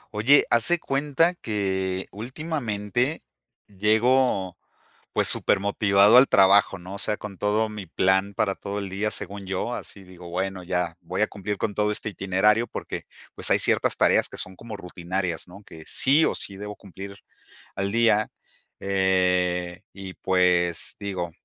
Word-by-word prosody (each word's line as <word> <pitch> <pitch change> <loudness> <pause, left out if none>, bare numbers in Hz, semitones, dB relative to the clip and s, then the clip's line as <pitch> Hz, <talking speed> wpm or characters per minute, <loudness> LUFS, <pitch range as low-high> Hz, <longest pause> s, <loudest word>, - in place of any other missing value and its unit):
Oye, 130 +8 +4
haz 120 -1 +3
de 175 - +4
cuenta 150 +3 +1
que 95 - -2
últimamente 120 +1 -3 0.4
llego, 105 -1 +1 0.6
pues, - - +4
super 95 - +3
motivado 100 +1 +4
al 130 +2 +8
trabajo, 100 +1 +4
¿no?, 90 +2 -9
o - - -7
sea, 105 +1 -1
con 105 -2 -8
todo 105 +3 0
mi 105 -2 -7
plan 95 +3 +1
para 95 0 0
todo 100 +1 -6
el 100 -1 -4
día, 100 +3 -2
según 100 -1 -3
yo, 95 +6 -3
así 100 - -9
digo: 90 -2 -13
"Bueno, 95 +1 -3
ya 90 -2 -2
voy 90 +2 -5
a 110 - +3
cumplir 105 0 -5
con 105 - -2
todo 105 +1 0
este 105 - -2
itinerario", 105 +3 +1
porque, - - -7 0.3
pues, - - +1
hay - - +5
ciertas - - +1
tareas - - +3
que - - -10
son 90 0 -5
como 110 -1 -9
rutinarias, 90 -1 -4
¿no?, 95 +3 -14
que 80 -5 -13
sí 145 +4 +4
o - - +1
sí 100 - -3
debo 105 +1 -7
cumplir 100 0 -11 0.6
al 100 +1 -3
día, 115 -2 +3 0.5
eh, 90 -2 0
y 95 -1 -9
pues, 90 -2 +1
digo: 95 -4 -4
100 Hz, 160 wpm, -24 LUFS, 95-105 Hz, 0.6 s, al